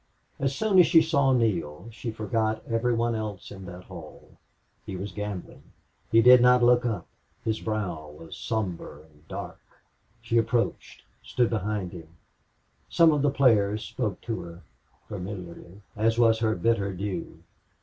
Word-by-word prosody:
As 135 0 0
soon 210 -1 +3
as 175 - +7
she 165 - +7
saw 155 -4 +2
Neale 95 - 0
she 115 +1 -6
forgot 110 0 -1
every 115 +1 0
one 115 0 0
else 110 -4 -5
in 95 -2 -9
that 90 0 -9
hall. 85 -5 -12 0.5
He 95 - -6
was 95 +2 -5
gambling. 105 -2 -6 0.5
He 115 0 +5
did 125 +1 +8
not 125 0 +5
look 120 0 +4
up. 105 -7 -3 0.4
His 110 0 0
brow 90 -9 -3
was 80 +2 -11
somber 90 -9 -4
and 75 0 -24
dark. - - -7 0.6
She 115 0 +1
approached 115 +1 -2 0.2
stood 120 -2 0
behind 105 -4 -2
him. 80 -3 -10 0.8
Some 165 -1 +5
of 150 -2 +1
the 145 - +3
players 110 -7 +2
spoke 105 -7 -3
to 115 -2 -4
her, 85 0 -11 0.4
familiarly, 95 -1 -8
as 115 +2 +1
was 115 -1 +4
her 110 -1 +1
bitter 100 -4 0
due. 95 -2 -5
110 Hz, 155 wpm, -26 LUFS, 95-120 Hz, 0.8 s, did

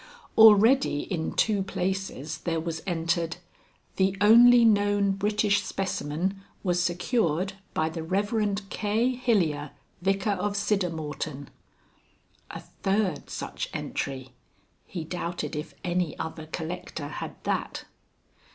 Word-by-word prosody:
Already 220 - +6
in 165 -4 -3
two 210 -3 +2
places 190 -5 -3
there 165 -1 -1
was 160 0 -4
entered: 170 -1 -1 0.6
"the 190 0 +2
only 235 +3 +8
known 205 -2 +3
British 205 +1 +1
specimen 190 +1 -3 0.2
was 180 -1 +1
secured 180 - 0 0.2
by 155 - +1
the 160 +1 -5
Rev. 205 +3 -1
K. 220 +4 +1
Hilyer, 175 - +1 0.3
Vicar 195 +2 +1
of 200 +1 -1
Siddermorton." 160 -8 -2 1.0
A - - -7 0.2
third 195 -5 0
such - - -5
entry. 130 -2 -4 0.6
He 175 -4 -5
doubted 175 0 -4
if 150 +2 -6
any 180 -2 -1
other 160 -1 -6
collector 160 -2 -5
had 150 - -6
that. - - -2
185 Hz, 110 wpm, -27 LUFS, 160-205 Hz, 1.0 s, only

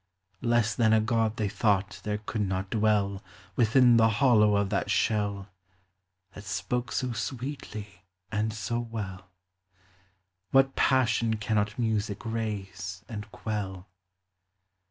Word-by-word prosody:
Less 115 -2 +2
than 110 -2 +3
a 110 - +5
God 115 0 0
they 105 - 0
thought 100 -1 0
there 105 0 -1
could 105 +1 -4
not 95 -1 -2
dwell 105 -3 +1 0.3
Within 120 +1 +5
the 115 0 +5
hollow 110 -3 +4
of 100 0 +1
that 100 - 0
shell, 100 -2 0 0.8
That 100 - -10
spoke 125 +4 -2
SO 130 -1 -1
sweetly 115 -5 -6 0.3
and 110 +1 0 0.2
BO 120 - 0
well. 100 -5 -6 1.2
What 135 0 +4
passion 115 -3 +2
cannot 105 -1 -1
Music, 110 -3 -1
raise 100 -4 -4
and 110 -2 -7
quell? 100 -3 -5
110 Hz, 120 wpm, -28 LUFS, 100-115 Hz, 1.2 s, a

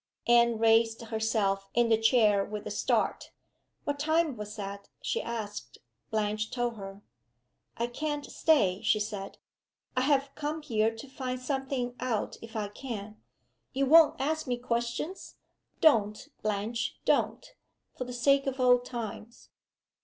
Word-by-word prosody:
Anne 235 -1 +5
raised 225 0 +4
herself 220 -3 0
in 240 -1 +3
the 225 - +6
chair 220 -3 +4
with 210 0 -6
a - - -4
start. - - 0 0.5
"What 285 -1 -2
time 315 -1 +2
was 210 -1 -7
that?" 200 -1 -7
she - - -1
asked. 210 - -6 0.3
Blanche 215 0 -1
told 240 -1 -1
her. 195 0 -9 0.7
"I 235 - 0
can't 295 +4 -3
stay," 205 - +2
she 215 - +2
said. 210 -2 -5 0.6
"I 255 - +2
have 275 0 +2
come 305 +1 -4
here 220 -4 +2
to 225 +4 -9
find 255 -1 -4
something 265 -2 -2
out 230 -5 -1
if 230 0 -11
I 210 -2 -2
can. 215 -2 -7 0.5
You 275 +1 +1
won't 320 +2 +6
ask 310 +2 -1
me 245 -1 0
questions? 240 +8 -3 0.5
Don't, 220 -4 +3
Blanche, 215 +2 -2
don't! - - +1 0.4
for 255 - -4
the 250 - -7
sake 275 +3 +3
of 270 0 -2
old 245 -1 +5
times." 235 -1 -7
235 Hz, 145 wpm, -29 LUFS, 215-265 Hz, 0.7 s, the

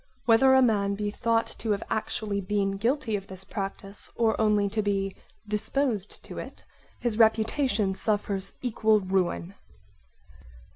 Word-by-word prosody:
Whether 265 +3 +6
a 265 - +6
man 200 -4 +2
be 205 0 -2
thought 230 +1 +1
to 225 - -4
have 200 - -3
actually 215 -2 -2
been 195 0 0
guilty 235 +1 0
of 195 -1 -5
this 190 -1 -8
practise 195 +1 -6
or 225 -1 +2
only 210 -2 +3
to 215 +2 -1
be 195 -2 -1 0.3
disposed 215 0 -2
to - - -7
it, - - -9 0.4
his 235 -2 -1
reputation 220 -2 +3
suffers 200 -1 -1
equal 220 -3 +3
ruin. 185 -1 -1
210 Hz, 140 wpm, -27 LUFS, 195-225 Hz, 0.4 s, Whether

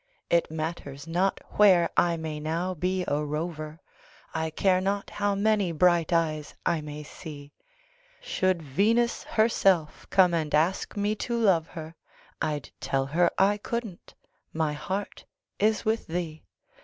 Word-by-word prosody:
It 170 0 +3
matters 155 -3 -5
not 180 +4 0 0.2
where 185 -5 +6
I 170 -1 +3
may 160 -2 -4
now 165 +4 -2
be 180 +2 -1
a 145 +1 0
rover, 155 +1 -4 0.5
I 160 0 -1
care 185 +3 +2
not 200 +1 -2
how 205 -1 0
many 205 -3 +2
bright 170 +1 +3
eyes 155 -3 0
I 165 -2 +1
may 150 0 -7
see; 145 -2 -10 0.7
Should 185 -3 0
Venus 220 - +1
herself 195 -8 +2
come 180 -3 +5
and 155 -3 0
ask 170 +7 +1
me 205 +1 +1
to 235 +2 -2
love 180 -8 +3
her, 160 -1 -8 0.5
I'd 145 -5 -2
tell 135 -1 0
her 170 +5 +3
I 200 +2 +4
couldn't 225 -4 -5 0.4
my 155 -2 0
heart 190 +7 -4 0.3
is 215 +1 +2
with 220 +1 0
thee. 160 -2 -4
170 Hz, 145 wpm, -27 LUFS, 155-195 Hz, 0.7 s, where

